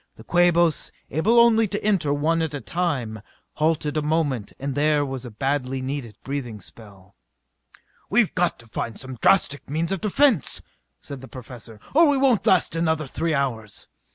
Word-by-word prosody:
The - - -13
Quabos, 175 -2 +3 0.2
able 210 - +3
only 225 -2 +5
to 205 +1 -4
enter 195 -9 +1
one 160 +3 +1
at 160 -2 -2
a - - -3
time, 135 - -2 0.4
halted 155 -1 0
a 155 - +1
moment 150 -8 -1
and 140 0 -3
there 145 +1 +2
was 135 -2 -5
a - - -6
badly 135 +3 -2
needed 130 -5 -5
breathing 130 -6 -4
spell. 100 -3 -13 0.9
"We've 215 -1 +3
got 175 -1 +1
to 115 - -15
find 115 0 -5
some 130 -3 -8
drastic 145 -8 +2
means 160 +4 -1
of 195 - -2
defence," 220 - +2 0.4
said 140 -2 -8
the 130 - -10
Professor, 120 -4 -10
"or 320 +2 +6
we 285 - +3
won't 265 -5 +2
last 185 -3 +3
another 160 -2 0
three 160 +4 -1
hours." 115 -7 -3
150 Hz, 170 wpm, -23 LUFS, 130-175 Hz, 0.9 s, or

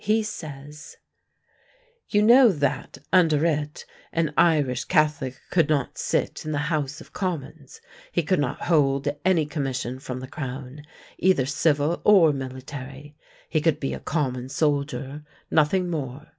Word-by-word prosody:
He 215 +2 +2
says: 150 -6 -8 1.1
"You 210 -1 +3
know 240 +1 +7
that, 145 -5 -2 0.2
under 160 -4 +4
it, 150 -2 -2 0.3
an 160 -2 0
Irish 145 -7 +2
Catholic 150 -6 +1
could 165 -4 +3
not 145 -4 -1
sit - - -1
in 155 - -4
the 150 - -1 0.2
House 145 -2 -2
of - - -16
Commons; 160 -6 -5 0.3
he 170 - 0
could 185 +3 +1
not 140 -1 -2
hold 140 -4 +2 0.2
any 180 -4 +3
commission 130 -4 -3
from 130 -2 -6
the 130 - -7
Crown, 130 +1 -7 0.4
either 185 -8 +3
civil 145 +3 +1
or 180 -7 +6
military; 135 +2 -8 0.3
he 155 - 0
could 155 -2 +1
be 135 - -2
a - - -5
common 130 -5 -2
soldier 140 -1 -1 0.3
nothing 165 +4 +2
more. 150 -3 -4
150 Hz, 145 wpm, -24 LUFS, 135-165 Hz, 1.1 s, know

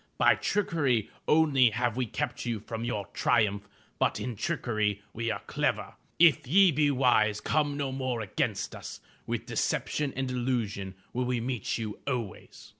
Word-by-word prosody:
By - - +6
trickery 145 - 0 0.2
only 145 -6 +5
have 120 +1 -1
we 125 -1 -1
kept 150 +6 -3
you 115 -3 -2
from 115 +2 -6
your 105 -4 -2
triumph, 105 -3 +1 0.3
but - - +1
in 125 -2 -4
trickery 105 -1 -1
are - - -30
we 115 0 -2
clever. - - -1 0.2
If 160 -8 +5
ye 190 +5 +6
be 150 0 +2
wise 120 -6 +3
come 145 -2 0
no 140 -2 -2
more 130 -3 -2
against 105 - -2
us. - - -8 0.3
With - - -2
deception 150 -2 -1
and 130 -1 -2
illusion 115 -6 -2 0.2
will 125 +1 0
we 125 -1 0
meet 120 -2 -2
you 110 -2 -5
always. 120 -8 -5
125 Hz, 160 wpm, -29 LUFS, 110-135 Hz, 0.3 s, By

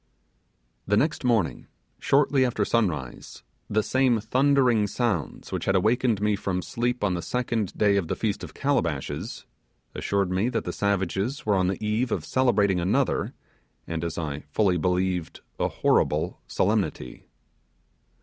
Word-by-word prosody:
The 105 +1 +3
next 150 +5 +1
morning, 115 -8 +1 0.3
shortly 140 -1 +3
after 115 -5 0
sunrise, 75 - -2 0.3
the 110 +1 +1
same 130 -2 +2
thundering 125 -1 +3
sounds 100 - -2
which - - -3
had 95 - +2
awakened 110 +3 +2
me 105 0 +1
from 90 -2 -2
sleep 120 -1 -2
on 100 -3 +2
the 85 - -2
second 115 -4 -2
day 100 -1 +3
of 95 -5 -1
the - - -1
Feast 105 -2 -2
of - - -9
Calabashes, 85 - -2 0.5
assured 100 -2 -1
me 95 +6 +1
that - - -2
the - - -4
savages 100 - -1
were 105 - +2
on 95 -2 +2
the 95 +3 -2
eve 110 +4 0
of - - -2
celebrating 105 -8 +2
another, 90 +2 0 0.5
and, 85 0 -4
as 85 -2 -3
I 75 -4 -3
fully 95 +2 +2
believed, 90 0 -1 0.2
a - - +2
horrible 75 +1 +1
solemnity. 65 - -1
105 Hz, 150 wpm, -26 LUFS, 90-120 Hz, 0.5 s, The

